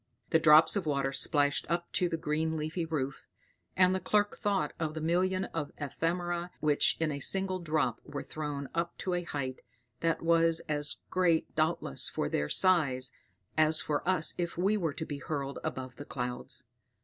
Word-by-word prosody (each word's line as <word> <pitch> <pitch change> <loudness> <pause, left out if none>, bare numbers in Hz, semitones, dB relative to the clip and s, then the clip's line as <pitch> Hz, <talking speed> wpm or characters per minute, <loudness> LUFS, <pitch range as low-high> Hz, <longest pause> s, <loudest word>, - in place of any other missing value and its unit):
The 160 - +5
drops 160 0 +7
of 190 -5 -1
water 140 -2 0
splashed 145 0 +2
up 170 0 -1
to 180 - +2
the 165 - -1
green 160 +1 -1
leafy 155 +3 -2
roof, 140 -4 -3 0.5
and 185 0 +5
the 190 - 0
clerk 205 +2 +1
thought 195 -9 0
of 155 -1 -2
the - - -3
million 185 +4 +1
of 150 -3 -3
ephemera 175 +4 -2
which 150 -2 +3
in 160 -1 +1
a 140 - -4
single 190 +5 +2
drop 155 -3 0
were 140 - -6
thrown 145 -2 -5
up 170 +1 -2
to 185 - -2
a 175 - 0
height, 140 -6 -4 0.4
that 165 0 0
was 165 0 +4
as 150 -1 -2
great 175 -3 +2
doubtless 155 - -1
for - - -2
their 75 0 -1
size, 145 -9 +3 0.4
as 155 0 +4
for 150 -1 0
us 180 -4 +3
if 170 -1 -2
we 195 +4 +2
were 165 -8 -1
to 160 - -4
be 145 -2 -5
hurled 140 -1 -4
above 130 -2 -5
the 145 - -8
clouds. 125 0 -5
160 Hz, 180 wpm, -31 LUFS, 145-175 Hz, 0.5 s, drops